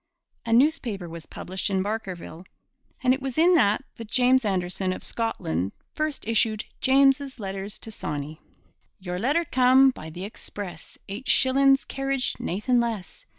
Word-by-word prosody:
A -, -, -1 dB
newspaper 235 Hz, -, +2 dB
was 165 Hz, -1 st, -9 dB
published 190 Hz, +3 st, -4 dB
in 190 Hz, -1 st, +1 dB
Barkerville. 190 Hz, -5 st, -5 dB, 0.6 s
And 255 Hz, 0 st, +5 dB
it 265 Hz, -, -3 dB
was 265 Hz, -2 st, -4 dB
in 340 Hz, +3 st, +5 dB
it -, -, +5 dB, 0.4 s
that 230 Hz, -2 st, -8 dB
James 255 Hz, +1 st, +4 dB
Anderson 185 Hz, -2 st, -1 dB
of -, -, -8 dB
Scotland 95 Hz, -, -2 dB, 0.2 s
first 305 Hz, -6 st, -3 dB
issued 220 Hz, -1 st, +2 dB, 0.2 s
Jeames's 270 Hz, 0 st, +3 dB
Letters 195 Hz, 0 st, -5 dB
to 225 Hz, -, -10 dB
Sawney. 150 Hz, -4 st, -5 dB, 0.6 s
Your 180 Hz, -1 st, -4 dB
letter 290 Hz, -, +1 dB
cam' 260 Hz, 0 st, +5 dB
by 160 Hz, -10 st, -9 dB
the 175 Hz, +4 st, -7 dB
express, 195 Hz, -4 st, -8 dB
Eight 210 Hz, +7 st, -7 dB
shillin's 270 Hz, +1 st, +4 dB
carriage, 270 Hz, -1 st, -1 dB
naethin' 215 Hz, +7 st, 0 dB
less! 235 Hz, -, -4 dB
225 Hz, 150 wpm, -25 LUFS, 185-265 Hz, 0.6 s, And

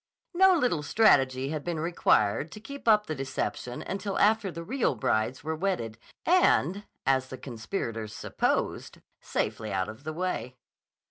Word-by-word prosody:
No 380 Hz, +1 st, +6 dB
little 245 Hz, -, +1 dB
strategy 135 Hz, -, +3 dB
had 155 Hz, -1 st, -3 dB
been 170 Hz, -2 st, -3 dB
required 155 Hz, -5 st, +2 dB
to -, -, -9 dB
keep 280 Hz, +4 st, -10 dB
up 210 Hz, -1 st, +5 dB
the 155 Hz, -, -3 dB
deception 130 Hz, -3 st, -4 dB
until 195 Hz, 0 st, -3 dB
after 210 Hz, -2 st, +3 dB
the 170 Hz, 0 st, -7 dB
real 230 Hz, -, 0 dB
brides 110 Hz, +3 st, 0 dB
were 160 Hz, +1 st, -2 dB
wedded, 155 Hz, -, -2 dB, 0.3 s
and, 205 Hz, -, +3 dB, 0.2 s
as 130 Hz, 0 st, +2 dB
the 130 Hz, -, -8 dB
conspirators 115 Hz, -, -5 dB
supposed, -, -, -1 dB, 0.2 s
safely 110 Hz, 0 st, -3 dB
out 95 Hz, +1 st, -1 dB
of 110 Hz, +5 st, -10 dB
the 155 Hz, +1 st, -4 dB
way. 165 Hz, -7 st, -3 dB
155 Hz, 150 wpm, -28 LUFS, 125-200 Hz, 0.3 s, No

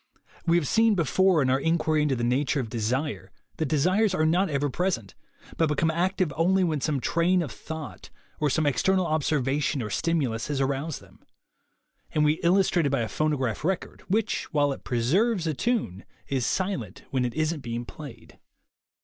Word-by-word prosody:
We 170 Hz, +1 st, +4 dB
have 160 Hz, -5 st, 0 dB
seen 225 Hz, -, +3 dB
before, 180 Hz, 0 st, +3 dB
in 130 Hz, -, +1 dB
our 130 Hz, -, +2 dB
inquiry 160 Hz, 0 st, +1 dB
into 150 Hz, -3 st, +1 dB
the 120 Hz, -, -3 dB
nature 135 Hz, +4 st, +1 dB
of 115 Hz, -4 st, -4 dB
de 120 Hz, -, -3 dB
sire, 130 Hz, +7 st, -2 dB, 0.3 s
that 160 Hz, -, -1 dB
desires 185 Hz, +8 st, +2 dB
are 155 Hz, -, +2 dB
not 180 Hz, +5 st, +2 dB
ever 145 Hz, -1 st, 0 dB
present, 145 Hz, -, -2 dB, 0.4 s
but 165 Hz, -, +3 dB
become 160 Hz, +2 st, +1 dB
active 180 Hz, -1 st, 0 dB
only 185 Hz, +4 st, +3 dB
when 155 Hz, -5 st, 0 dB
some 145 Hz, -1 st, 0 dB
train 170 Hz, +7 st, +2 dB
of 145 Hz, -, -6 dB
thought 160 Hz, -2 st, -8 dB, 0.3 s
or 150 Hz, -, +2 dB
some 155 Hz, +3 st, +1 dB
ex 140 Hz, -6 st, +1 dB
ternal 190 Hz, -1 st, +2 dB
observation 150 Hz, -2 st, 0 dB
or 105 Hz, -, -5 dB
stimulus 140 Hz, -9 st, -1 dB
has 145 Hz, -2 st, -2 dB
aroused 140 Hz, +3 st, -2 dB
them; -, -, -19 dB, 0.9 s
and 150 Hz, 0 st, +3 dB
we 150 Hz, +2 st, +2 dB
illustrated 175 Hz, -4 st, +3 dB
by 135 Hz, -, +1 dB
a 115 Hz, -, -1 dB
phonograph 135 Hz, -5 st, -1 dB
record, 185 Hz, +2 st, -2 dB
which, 215 Hz, +3 st, -1 dB
while 145 Hz, -3 st, +2 dB
it -, -, -11 dB
preserves 170 Hz, -, +1 dB
a 160 Hz, -, 0 dB
tune, 145 Hz, -, -1 dB, 0.2 s
is 130 Hz, -3 st, -1 dB
silent 180 Hz, -, -2 dB
when 130 Hz, -2 st, +1 dB
it 120 Hz, -1 st, -3 dB
isn't 155 Hz, 0 st, 0 dB
being 120 Hz, -2 st, -5 dB
played. 145 Hz, 0 st, -11 dB
155 Hz, 185 wpm, -26 LUFS, 135-175 Hz, 0.9 s, We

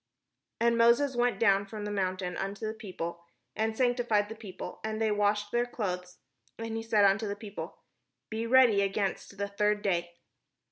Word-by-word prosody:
And 235 Hz, 0 st, +3 dB
Moses 240 Hz, +4 st, +4 dB
went 240 Hz, 0 st, +1 dB
down 200 Hz, -3 st, +3 dB
from 210 Hz, 0 st, -6 dB
the 210 Hz, -, -3 dB
mount 185 Hz, -2 st, -1 dB
unto 195 Hz, +4 st, -4 dB
the 215 Hz, -, -2 dB
peo 210 Hz, -4 st, -10 dB
ple, 170 Hz, +1 st, -4 dB, 0.3 s
and 220 Hz, 0 st, -1 dB
sanctified 240 Hz, -5 st, +2 dB
the 225 Hz, -, -6 dB
people; 195 Hz, -4 st, -8 dB
and 220 Hz, 0 st, -3 dB
they 220 Hz, -1 st, +2 dB
washed 205 Hz, 0 st, +1 dB
their 240 Hz, 0 st, +1 dB
clothes. 180 Hz, -6 st, -4 dB, 0.4 s
And 225 Hz, 0 st, -4 dB
he 225 Hz, -, -2 dB
said 220 Hz, -2 st, +3 dB
unto 200 Hz, +3 st, +3 dB
the 200 Hz, -, -2 dB
people: 205 Hz, -1 st, -8 dB, 0.3 s
" -, -, -55 dB
Be 225 Hz, +1 st, -2 dB
ready 240 Hz, -5 st, +6 dB
against 200 Hz, 0 st, -2 dB
the 200 Hz, +1 st, -1 dB
third 210 Hz, +1 st, 0 dB
day." 175 Hz, -3 st, -1 dB
210 Hz, 185 wpm, -30 LUFS, 195-225 Hz, 0.4 s, ready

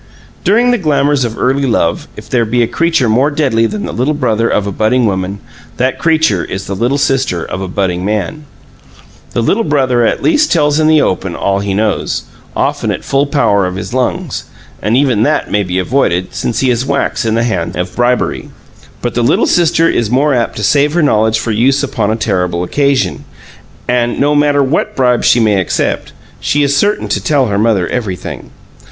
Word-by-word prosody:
During 235 Hz, +5 st, +3 dB
the 245 Hz, -, +1 dB
glamors 145 Hz, -4 st, +1 dB
of 115 Hz, -1 st, -5 dB
early 135 Hz, +2 st, +1 dB
love, 85 Hz, -8 st, 0 dB
if -, -, -10 dB
there 120 Hz, -2 st, +1 dB
be 120 Hz, +2 st, +1 dB
a -, -, 0 dB
creature 165 Hz, -5 st, +1 dB
more 125 Hz, +7 st, +2 dB
deadly 135 Hz, -7 st, +1 dB
than 210 Hz, -, -4 dB
the -, -, -4 dB
little 140 Hz, +5 st, 0 dB
brother 115 Hz, -5 st, 0 dB
of 105 Hz, -, 0 dB
a 100 Hz, -, -3 dB
budding 115 Hz, +5 st, +1 dB
woman, 95 Hz, -1 st, -2 dB, 0.4 s
that 130 Hz, +1 st, 0 dB
creature 160 Hz, -, +2 dB
is 95 Hz, +1 st, -5 dB
the 100 Hz, -, -4 dB
little 120 Hz, +7 st, 0 dB
sister 135 Hz, -11 st, 0 dB
of 95 Hz, -, -5 dB
a 95 Hz, -, -3 dB
budding 90 Hz, -1 st, -2 dB
man. 110 Hz, +10 st, -3 dB, 0.9 s
The 115 Hz, -, 0 dB
little 215 Hz, -, +1 dB
brother 130 Hz, -, +1 dB
at 115 Hz, -, 0 dB
least 305 Hz, -1 st, +2 dB
tells 150 Hz, -2 st, +2 dB
in 155 Hz, -, +3 dB
the 155 Hz, -1 st, +4 dB
open 95 Hz, -1 st, -2 dB
all 100 Hz, 0 st, 0 dB
he 100 Hz, -1 st, -2 dB
knows, 105 Hz, 0 st, -1 dB, 0.3 s
often -, -, -1 dB
at -, -, -3 dB
full 140 Hz, +1 st, 0 dB
power 100 Hz, -10 st, +2 dB
of 90 Hz, -, -5 dB
his 95 Hz, +3 st, -6 dB
lungs, 130 Hz, +5 st, -2 dB, 0.4 s
and 110 Hz, +4 st, +1 dB
even 130 Hz, -6 st, +2 dB
that 115 Hz, -, 0 dB
may 105 Hz, -, +2 dB
be 90 Hz, -2 st, -3 dB
avoided, 95 Hz, -3 st, 0 dB
since 120 Hz, -, -2 dB
he 130 Hz, -1 st, +2 dB
is 120 Hz, 0 st, 0 dB
wax 140 Hz, -1 st, -1 dB
in 110 Hz, -1 st, 0 dB
the 115 Hz, -, +1 dB
hands 95 Hz, -8 st, -2 dB
of 90 Hz, +1 st, -4 dB
bribery; 120 Hz, +1 st, 0 dB, 0.5 s
but 120 Hz, -, -1 dB
the 120 Hz, -, 0 dB
little 120 Hz, -, +2 dB
sister 165 Hz, -1 st, +2 dB
is 115 Hz, -9 st, 0 dB
more 140 Hz, +4 st, +2 dB
apt 120 Hz, -2 st, -1 dB
to 105 Hz, -, -5 dB
save 145 Hz, +6 st, +2 dB
her 175 Hz, -1 st, +2 dB
knowledge 110 Hz, -5 st, +2 dB
for 115 Hz, +1 st, -2 dB
use 130 Hz, +6 st, +2 dB
upon 120 Hz, -7 st, -1 dB
a 110 Hz, -, +1 dB
terrible 90 Hz, -5 st, -1 dB
occasion; 140 Hz, +7 st, 0 dB, 0.6 s
and, 120 Hz, -1 st, 0 dB
no 145 Hz, +1 st, +2 dB
matter 145 Hz, -1 st, +3 dB
what 135 Hz, +4 st, -1 dB
bribes 125 Hz, -2 st, +2 dB
she 120 Hz, -, +4 dB
may 105 Hz, -4 st, +2 dB
accept, 90 Hz, -, -2 dB, 0.3 s
she 145 Hz, 0 st, +1 dB
is 140 Hz, 0 st, +1 dB
certain 205 Hz, +8 st, +1 dB
to -, -, -2 dB
tell 145 Hz, -3 st, +2 dB
her 100 Hz, 0 st, 0 dB
mother 105 Hz, -5 st, +1 dB
everything. 105 Hz, -8 st, -5 dB
120 Hz, 205 wpm, -13 LUFS, 105-145 Hz, 0.9 s, the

